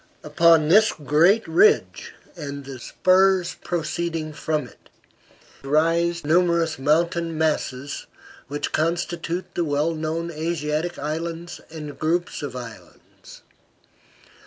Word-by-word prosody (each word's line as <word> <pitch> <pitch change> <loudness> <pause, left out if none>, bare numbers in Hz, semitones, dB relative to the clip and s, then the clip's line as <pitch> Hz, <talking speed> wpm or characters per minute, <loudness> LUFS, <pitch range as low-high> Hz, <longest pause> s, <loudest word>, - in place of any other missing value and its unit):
Upon 160 +1 +4
this 215 +7 +5
great 160 - +3
ridge, 420 +4 +2 0.2
and 140 -4 -7
the 135 -2 -8
spurs 185 +5 +2
proceeding 165 -1 -3
from 150 -3 -2
it, - - -21 0.7
rise 165 +3 +1
numerous 170 -1 +2
mountainous 165 +4 +1
masses, 145 -3 -2 0.4
which 145 +2 -3
constitute 170 +2 -2
the 175 - 0
well 150 +1 0
known 160 +2 -3
Atlantic 160 +1 -2
islands 165 +3 -5
and 150 -3 -8
groups 175 +3 -1
of 140 -4 -6
islands. 120 -3 -12
160 Hz, 105 wpm, -23 LUFS, 150-170 Hz, 0.7 s, this